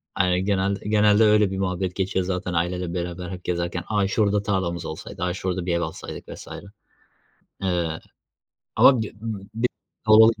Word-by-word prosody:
Aynen, 90 +1 +2
genelde 100 +1 0
genelde 105 0 +5
öyle 105 -2 +4
bir 95 - -3
muhabbet 95 -1 -2
geçiyor 95 -1 0
zaten 90 -1 -2
aileyle 90 +1 -1
beraber 90 0 -4
hep 90 -1 -7
gezerken. 85 0 -2
"A! 105 -2 +1
Şurada 105 -1 +2
tarlamız 85 -5 -1
olsaydı. 80 +3 -6
A! 90 - 0
Şurada 90 -1 -3
bir 90 - 0
ev 85 - +1
alsaydık." 80 -1 -6
vs. - - -9 1.1
Eee, 85 -4 -1 0.8
ama 130 -4 +7
bi 110 +1 -4 0.4
kalabalık 110 0 +7
95 Hz, 150 wpm, -24 LUFS, 90-105 Hz, 1.1 s, ama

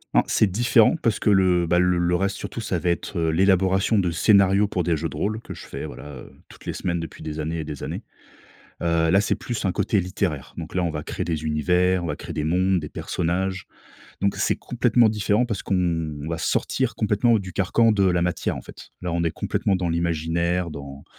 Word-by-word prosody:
En - - +6
c'est 110 - +3
différent 120 - +4
parce 110 -4 +1
que - - +1
le, 90 -3 +3
bah, 90 - +3
l 90 - +4
le 90 -1 +2
reste 100 +2 0
surtout, 115 - -6
ça 90 -5 -2
va 90 - -1
être, 85 +2 -2
heu, 80 -1 +1
l'élaboration 95 +4 +3
de 90 -2 +1
scénarios 100 +3 +4
pour 95 - -1
des 85 -2 +1
jeux 80 +2 -2
de - - -9
rôle 105 +8 -1
que - - -8
je - - -10
fais - - -6
voilà, - - -9 0.2
heu, - - -15 0.2
toutes - - -16
les - - -3
semaines 85 -1 -2
depuis 80 - -8
des 80 0 -5
années 80 +2 -2
et - - -3
des 75 -2 -7
années. - - -4 0.8
Heu 85 -1 +2
là, 95 - +5
c'est 100 - +1
plus 120 -4 -4
un 95 - +1
côté 105 - +1
littéraire. 90 -6 -3
Donc - - -7
là, 90 - 0
on - - 0
va 75 -1 -4
créer - - -4
des 80 -2 -2
univers, 90 +4 +2
on 85 - -3
va 75 - -2
créer - - -8
des 75 - -2
mondes, 90 +3 +2
des 75 - -6
personnages. 95 +5 -2 0.5
Donc 100 0 +1
c'est - - 0
complètement 120 -1 +2
différent 105 +2 +1
parce 110 -5 -4
qu'on 80 -5 -1
va 85 0 -2
sortir 130 +9 0
complètement 110 +2 +2
du 95 -2 -8
carcan 110 +4 +3
de 100 -2 +2
la 90 -2 +2
matière, 90 -1 -1
en - - -7
fait. - - -13
Là, 90 -2 -3
on 85 0 0
est 85 - 0
complètement 95 +3 -1
dans 90 -1 -2
l'imaginaire, 85 +1 0
dans 70 -1 -9
90 Hz, 230 wpm, -23 LUFS, 80-100 Hz, 0.8 s, En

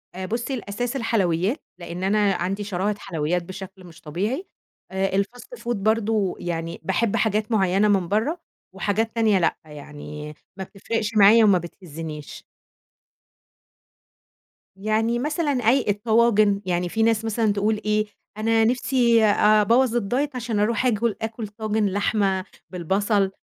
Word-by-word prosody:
آآ 185 0 -4
بُصّي، 235 +6 -3
الأساس 240 +2 -4
الحلويات 210 - 0 0.2
لإن 175 +2 -6
أنا 205 0 +2
عندي 190 +3 -2
شراهة 200 +1 -1
حلويات 170 -2 -2
بشكل 190 +1 -9
مش 170 -2 -14
طبيعي، 205 - -3 0.4
آآ 190 0 -1
الfast 245 - -4
food 240 0 -2
برضه 215 -1 0
يعني 165 -1 -4
باحب 200 +2 0
حاجات 215 0 0
معيّنة 195 -1 +3
من 195 -4 +2
برّه 225 - 0 0.4
وحاجات 210 +4 -1
تانية 220 -4 +3
لأ، 165 - +1
يعني 150 0 -9 0.2
ما 190 - -4
بتفرِقش 210 +3 -4
معايا 215 +3 +7
وما 200 -3 +5
بتهزّنيش. 160 -3 -8 2.3
يعني 220 +4 0
مثلًا 300 +3 -1
أي 250 0 +2
الطواجن، 210 -1 +3
يعني 175 -1 -1
فيه 220 +5 0
ناس 225 -1 +2
مثلًا 220 -1 +1
تقول 210 +1 0
إيه، 215 0 +1 0.3
أنا 225 +1 +2
نِفْسي 240 -1 +3
أبوّظ 215 +4 +4
الdiet 250 +7 0
عشان 230 -4 -2
أرُوح 230 +4 +1
آكُل 230 -2 +1
آكُل 225 0 -4
طاجن 215 0 -1
لحمة 195 -1 0 0.2
بالبصل 195 +3 0
210 Hz, 135 wpm, -23 LUFS, 190-225 Hz, 2.3 s, معايا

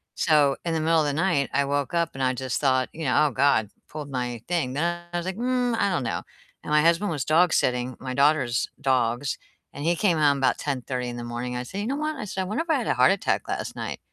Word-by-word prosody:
so 145 -3 +3
in 165 - 0
the - - +1
middle 165 0 +3
of - - 0
the 145 - 0
night, 165 -4 +1
I 140 0 +2
woke 140 +1 -1
up 170 0 +1
and 135 - -5
I 130 0 +2
just 130 -1 -3
thought, 130 -2 +2
you 160 - -6
know, 150 +4 +3
"Oh, - - -3
god, 130 -5 +2 0.2
pulled 150 -2 -7
my 125 -3 -3
thing," 170 -8 0
then 175 +4 -1
I - - 0
was 175 - -3
like, 190 0 -3
"Mm, 245 -1 0
I 200 - +2
don't 170 -7 0
know." - - -2 0.4
And - - -6
my 150 0 +5
husband 170 +4 +2
was 145 -5 -2
dog-sitting 130 -7 +2
my 130 -1 -5
daughter's 140 -5 +2
dogs, 125 0 +1 0.4
and 145 - -6
he 170 +1 +3
came 180 -6 +2
home 145 -2 +3
about 130 -1 +2
10:30 125 -3 -3
in 120 - -6
the 120 - -5
morning. 120 +1 -4
I 125 - -3
said, 190 +11 -6
"You 215 - -3
know 275 - -1
what?" 305 0 -2
I - - -5
said, 190 -1 -3
"I - - -2
wonder 245 - -2
if 340 - -22
I - - +4
had - - -3
a - - +2
heart - - +5
attack - - 0
last - - -3
night." - - -5
145 Hz, 270 wpm, -25 LUFS, 130-170 Hz, 0.4 s, my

